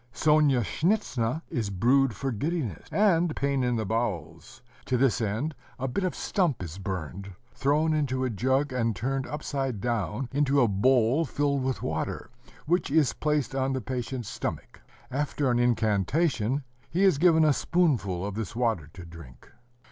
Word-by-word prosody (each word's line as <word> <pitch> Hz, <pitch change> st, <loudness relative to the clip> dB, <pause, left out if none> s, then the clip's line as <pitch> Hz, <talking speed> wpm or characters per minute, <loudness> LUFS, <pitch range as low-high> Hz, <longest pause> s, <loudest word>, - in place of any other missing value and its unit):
Sonyashnitza 150 Hz, -, +1 dB
is 110 Hz, -4 st, -1 dB
brewed 120 Hz, +5 st, +2 dB
for 135 Hz, -1 st, -2 dB
giddiness, 130 Hz, -, -3 dB
and 175 Hz, -6 st, +3 dB
pain 140 Hz, -2 st, 0 dB
in 125 Hz, -1 st, +1 dB
the 110 Hz, -1 st, -1 dB
bowels. 105 Hz, -7 st, -3 dB, 0.2 s
To 125 Hz, -, +1 dB
this 125 Hz, -1 st, +2 dB
end, 110 Hz, +9 st, -1 dB, 0.2 s
a 135 Hz, -, -2 dB
bit 160 Hz, +10 st, -2 dB
of 185 Hz, -, -1 dB
stump 170 Hz, -, 0 dB
is 85 Hz, +2 st, -7 dB
burned, 95 Hz, 0 st, -5 dB, 0.2 s
thrown 150 Hz, +5 st, +1 dB
into 130 Hz, -4 st, 0 dB
a 130 Hz, -, 0 dB
jug, 130 Hz, +5 st, 0 dB
and 115 Hz, -3 st, 0 dB
turned 130 Hz, +7 st, -2 dB
upside 135 Hz, -4 st, -3 dB
down 115 Hz, +1 st, -2 dB
into 140 Hz, 0 st, +2 dB
a 120 Hz, -, +5 dB
bowl 125 Hz, +7 st, +3 dB
filled 140 Hz, 0 st, 0 dB
with 130 Hz, -1 st, -2 dB
water, -, -, -3 dB, 0.3 s
which 175 Hz, +5 st, +1 dB
is 150 Hz, -1 st, +3 dB
placed 150 Hz, -2 st, -1 dB
on 135 Hz, 0 st, 0 dB
the 130 Hz, -, -2 dB
patient's 125 Hz, 0 st, -4 dB
stomach: -, -, -5 dB, 0.3 s
after 140 Hz, 0 st, 0 dB
an 120 Hz, -, +2 dB
incantation, 120 Hz, -, +1 dB, 0.3 s
he 180 Hz, +4 st, +1 dB
is 185 Hz, -8 st, +4 dB
given 160 Hz, -2 st, +5 dB
a 150 Hz, -, +5 dB
spoonful 125 Hz, -, +1 dB
of 100 Hz, -, -4 dB
this 110 Hz, +1 st, -5 dB
water 115 Hz, -11 st, 0 dB
to 90 Hz, -2 st, -10 dB
drink. 80 Hz, -8 st, -13 dB
130 Hz, 160 wpm, -27 LUFS, 110-145 Hz, 0.3 s, a